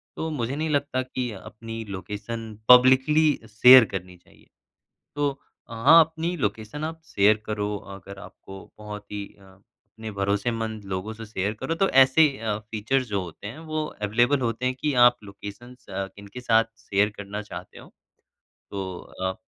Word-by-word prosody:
तो 160 Hz, -, -3 dB
मुझे 125 Hz, -2 st, -3 dB
नहीं 155 Hz, +2 st, -2 dB
लगता 140 Hz, -3 st, 0 dB
कि 125 Hz, -2 st, -4 dB
अपनी 115 Hz, +3 st, -8 dB
लोकेशन 105 Hz, +5 st, -6 dB, 0.3 s
पब्लिकली 130 Hz, +5 st, +6 dB, 0.2 s
शेयर 125 Hz, +2 st, +8 dB
करनी 90 Hz, -1 st, -6 dB
चाहिए। -, -, -24 dB, 0.7 s
तो 145 Hz, -1 st, -1 dB, 0.3 s
हाँ, 115 Hz, +9 st, +6 dB
अपनी 165 Hz, +2 st, 0 dB
लोकेशन 110 Hz, +3 st, -3 dB
आप 160 Hz, 0 st, -5 dB
शेयर 105 Hz, -3 st, +3 dB
करो 105 Hz, -1 st, -2 dB, 0.2 s
अगर 100 Hz, +1 st, -11 dB
आपको 95 Hz, -1 st, -12 dB
बहुत 105 Hz, -1 st, -9 dB
ही 105 Hz, -1 st, -4 dB
अ, 100 Hz, -, -20 dB
अपने 100 Hz, +3 st, -13 dB
भरोसेमंद 105 Hz, +2 st, -2 dB
लोगों 95 Hz, +4 st, -3 dB
से 115 Hz, +1 st, -9 dB
शेयर 100 Hz, -1 st, -2 dB
करो। 165 Hz, -, -2 dB
तो 195 Hz, +4 st, +1 dB
ऐसे 135 Hz, +4 st, +6 dB
अ, 110 Hz, -2 st, -2 dB
फ़ीचर्स 110 Hz, +5 st, -2 dB
जो 100 Hz, -2 st, -1 dB
होते 90 Hz, +3 st, -10 dB
हैं 115 Hz, +8 st, -8 dB
वो 155 Hz, -1 st, -3 dB
अवेलेबल 120 Hz, +5 st, +1 dB
होते 115 Hz, +1 st, -2 dB
हैं, 130 Hz, -, 0 dB
कि 145 Hz, +2 st, -2 dB
आप 120 Hz, 0 st, +6 dB
लोकेशंस 105 Hz, +6 st, -11 dB
अ, 95 Hz, 0 st, -3 dB
किनके 100 Hz, +5 st, -10 dB
साथ 115 Hz, -2 st, +3 dB
शेयर 105 Hz, -1 st, +1 dB
करना 100 Hz, +1 st, -6 dB
चाहते 105 Hz, -, -10 dB
हो। -, -, -14 dB, 0.8 s
तो 95 Hz, -3 st, -5 dB, 0.3 s
अ, 95 Hz, 0 st, -1 dB
110 Hz, 160 wpm, -25 LUFS, 100-130 Hz, 0.8 s, शेयर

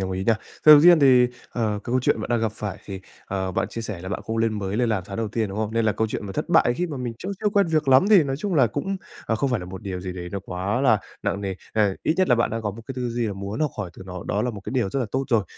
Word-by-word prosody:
đồng 95 Hz, 0 st, -2 dB
ý 95 Hz, +1 st, -3 dB
nha. 110 Hz, +2 st, +3 dB, 0.3 s
Sầu 150 Hz, -1 st, +11 dB
tiên 170 Hz, 0 st, +7 dB
thì, 125 Hz, -3 st, +6 dB, 0.2 s
ờ, 115 Hz, -3 st, -1 dB
cái 105 Hz, -, -3 dB
câu 125 Hz, +2 st, +1 dB
chuyện 115 Hz, -, +1 dB
bạn -, -, -5 dB
đang 120 Hz, -1 st, +2 dB
gặp 110 Hz, -2 st, 0 dB
phải 105 Hz, -2 st, -5 dB
thì, 95 Hz, -2 st, -7 dB, 0.3 s
ờ, 95 Hz, -1 st, -2 dB
bạn 95 Hz, +2 st, -1 dB
chia 115 Hz, -, -6 dB
sẻ 105 Hz, -6 st, -5 dB
là 95 Hz, -, -7 dB
bạn 100 Hz, -, -4 dB
không 110 Hz, -, -4 dB
lên 115 Hz, -1 st, 0 dB
mới 100 Hz, 0 st, -3 dB
lên 120 Hz, 0 st, +1 dB
làm 105 Hz, -4 st, 0 dB
tháng 100 Hz, -, -6 dB
đầu 115 Hz, -2 st, -2 dB
tiên, 110 Hz, 0 st, -1 dB
đúng 100 Hz, +2 st, -6 dB
không? 110 Hz, 0 st, -2 dB
Nên 115 Hz, -1 st, +2 dB
là 110 Hz, -, +3 dB
câu 110 Hz, -, 0 dB
chuyện 105 Hz, -, -5 dB
mà 95 Hz, -, -6 dB
thất -, -, -3 dB
bại, 120 Hz, -, +4 dB
khi 180 Hz, -, 0 dB
mà 150 Hz, -4 st, -6 dB
mình 125 Hz, -2 st, -3 dB
chưa 185 Hz, -, -6 dB
chưa 210 Hz, -, +2 dB
quen 200 Hz, -2 st, +3 dB
việc 155 Hz, -3 st, 0 dB
lắm 135 Hz, +8 st, +6 dB
thì 200 Hz, -6 st, +8 dB
nói 135 Hz, -2 st, -2 dB
chung 190 Hz, +5 st, -2 dB
là 135 Hz, -6 st, +5 dB
cũng, 145 Hz, -, -3 dB, 0.3 s
ờ, 115 Hz, -, +1 dB
không 135 Hz, +4 st, 0 dB
phải 125 Hz, -4 st, 0 dB
là 90 Hz, -, -7 dB
một 95 Hz, 0 st, -8 dB
điều 95 Hz, -3 st, -4 dB
gì 90 Hz, 0 st, -5 dB
đấy 90 Hz, -1 st, -6 dB
nó 100 Hz, -, -3 dB
quá 95 Hz, +5 st, -2 dB
là 120 Hz, -6 st, +4 dB, 0.2 s
nặng 100 Hz, -, -1 dB
nề. 95 Hz, -1 st, -3 dB, 0.2 s
Ờ, 105 Hz, -3 st, +2 dB
ít 155 Hz, -, +1 dB
nhất 185 Hz, -1 st, +2 dB
là 125 Hz, -, +6 dB
bạn 115 Hz, -, +1 dB
đang 115 Hz, 0 st, -3 dB
có 105 Hz, -, -1 dB
một 110 Hz, +3 st, -10 dB
cái -, -, -5 dB
tư 125 Hz, -1 st, -2 dB
duy 120 Hz, 0 st, -1 dB
là 105 Hz, -, -2 dB
muốn 100 Hz, +6 st, -5 dB
học 155 Hz, -2 st, +1 dB
hỏi 95 Hz, -5 st, -3 dB
từ -, -, -11 dB
nó, 90 Hz, -1 st, -7 dB
đó 105 Hz, -, 0 dB
là 125 Hz, -, 0 dB
một 105 Hz, -3 st, -8 dB
cái -, -, -7 dB
điều 120 Hz, -7 st, 0 dB
rất 135 Hz, -, -1 dB
là 125 Hz, -, -1 dB
tốt 135 Hz, +1 st, -1 dB
rồi. 110 Hz, -4 st, +2 dB
110 Hz, 345 wpm, -24 LUFS, 100-130 Hz, 0.3 s, Sầu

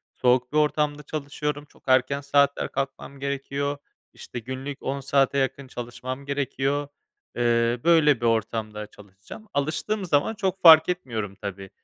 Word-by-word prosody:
soğuk 125 Hz, 0 st, +2 dB
bir -, -, +2 dB
ortamda 150 Hz, -1 st, +1 dB
çalışıyorum. 145 Hz, 0 st, -4 dB
Çok -, -, -25 dB
erken 130 Hz, +2 st, +3 dB
saatler 140 Hz, 0 st, +2 dB
kalkmam 135 Hz, 0 st, -4 dB
gerekiyor. 140 Hz, +1 st, -2 dB, 0.4 s
İşte, 120 Hz, -, -8 dB
günlük 130 Hz, +4 st, -6 dB
10 140 Hz, +1 st, -2 dB
saate 140 Hz, 0 st, +2 dB
yakın 135 Hz, 0 st, -1 dB
çalışmam 125 Hz, +2 st, -6 dB
gerekiyor. 140 Hz, 0 st, -1 dB, 0.5 s
Eee, 120 Hz, 0 st, +2 dB
böyle 150 Hz, -7 st, +4 dB
bir -, -, -1 dB
ortamda 110 Hz, -2 st, -1 dB
çalışacağım. 100 Hz, -, -14 dB
Alıştığım 165 Hz, +8 st, -1 dB
zaman 150 Hz, +5 st, +2 dB
çok 190 Hz, -2 st, -2 dB
fark 160 Hz, -1 st, +9 dB
etmiyorum 115 Hz, -, -3 dB
tabii, 100 Hz, -1 st, -7 dB
140 Hz, 135 wpm, -25 LUFS, 120-145 Hz, 0.5 s, fark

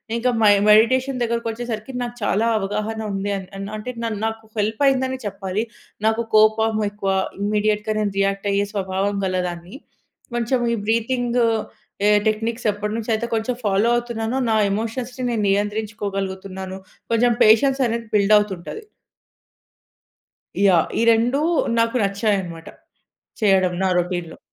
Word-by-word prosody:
ఇంకా 235 Hz, +2 st, +1 dB
my 210 Hz, -, +7 dB, 0.2 s
meditation 255 Hz, +5 st, +4 dB
దగ్గర 235 Hz, 0 st, 0 dB
వచ్చేసరికి 230 Hz, +1 st, -5 dB
నాకు 240 Hz, 0 st, -6 dB
చాలా 205 Hz, +2 st, +1 dB
అవగాహన 215 Hz, +2 st, -3 dB
ఉంది 195 Hz, +1 st, -2 dB
అని 195 Hz, +1 st, -7 dB
అంటే 215 Hz, +4 st, -5 dB
నా 230 Hz, -, 0 dB, 0.2 s
నాకు 225 Hz, 0 st, -4 dB
హెల్ప్ 215 Hz, +5 st, -1 dB
అయింది 260 Hz, -1 st, +2 dB
అని 260 Hz, -, -3 dB
చెప్పాలి. 195 Hz, +1 st, -3 dB, 0.4 s
నాకు 225 Hz, +1 st, +2 dB
కోపం 215 Hz, 0 st, +4 dB
ఎక్కువ. 205 Hz, -1 st, -2 dB, 0.3 s
ఇమ్మీడియేట్‌గా 210 Hz, +1 st, 0 dB
నేను 205 Hz, -2 st, -1 dB
రియాక్ట్ 195 Hz, 0 st, 0 dB
అయ్యే 200 Hz, 0 st, +1 dB
స్వభావం 195 Hz, 0 st, -1 dB
గల 185 Hz, -1 st, -1 dB
దాన్ని. 175 Hz, +4 st, -8 dB, 0.6 s
కొంచెం 240 Hz, +1 st, 0 dB
ఈ -, -, -5 dB
బ్రీతింగు 240 Hz, +1 st, +1 dB, 0.6 s
ఎ -, -, +5 dB, 0.2 s
టెక్‌నిక్స్ 225 Hz, +2 st, -2 dB
ఎప్పటి 210 Hz, +1 st, -4 dB
నుంచి 230 Hz, 0 st, -3 dB
అయితే 225 Hz, +2 st, -2 dB
కొంచెం 225 Hz, +2 st, -1 dB
ఫాలో 205 Hz, +3 st, +2 dB
అవుతున్నానో, 235 Hz, +1 st, -2 dB
నా 220 Hz, -, +3 dB
ఎమోషన్స్‌ని 240 Hz, +4 st, -3 dB
నేను 220 Hz, -3 st, -1 dB
నియంత్రించుకోగలుగుతున్నాను. 195 Hz, -2 st, -3 dB, 0.3 s
కొంచెం 235 Hz, +1 st, +3 dB
పేషెన్స్ 265 Hz, +5 st, +4 dB
అనేది 230 Hz, 0 st, -3 dB
బిల్డ్ 210 Hz, +1 st, +5 dB
అవుతుంటది. 205 Hz, -, -5 dB, 1.8 s
యాహ్! 175 Hz, -4 st, +4 dB
ఈ -, -, +2 dB
రెండు 240 Hz, +5 st, +1 dB, 0.4 s
నాకు 230 Hz, +2 st, +1 dB
నచ్చాయనమాట. 195 Hz, -5 st, -1 dB, 0.8 s
చేయడం 190 Hz, -3 st, +3 dB
నా 190 Hz, -, +2 dB
రోటీన్‌లో. 175 Hz, -2 st, -2 dB
215 Hz, 135 wpm, -21 LUFS, 195-230 Hz, 1.8 s, my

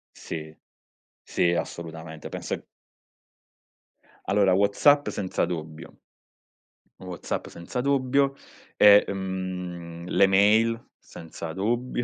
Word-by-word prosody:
Sì, 80 Hz, -1 st, -7 dB, 0.7 s
sì, 85 Hz, -1 st, +1 dB
assolutamente, 80 Hz, -2 st, -6 dB
penso -, -, -5 dB, 1.6 s
Allora, 100 Hz, -1 st, +3 dB
WhatsApp 100 Hz, +10 st, +4 dB
senza 95 Hz, -3 st, -1 dB
dubbio. 80 Hz, -2 st, -7 dB, 1.0 s
WhatsApp 90 Hz, -2 st, -5 dB
senza 85 Hz, +8 st, -5 dB
dubbio 140 Hz, 0 st, +2 dB, 0.4 s
e, 105 Hz, 0 st, +8 dB
mhmm, 90 Hz, -3 st, -5 dB
le 100 Hz, -, +4 dB
mail 110 Hz, +4 st, +3 dB
senza 80 Hz, 0 st, -9 dB
dubbio, 120 Hz, +6 st, -1 dB
95 Hz, 85 wpm, -26 LUFS, 85-115 Hz, 1.6 s, e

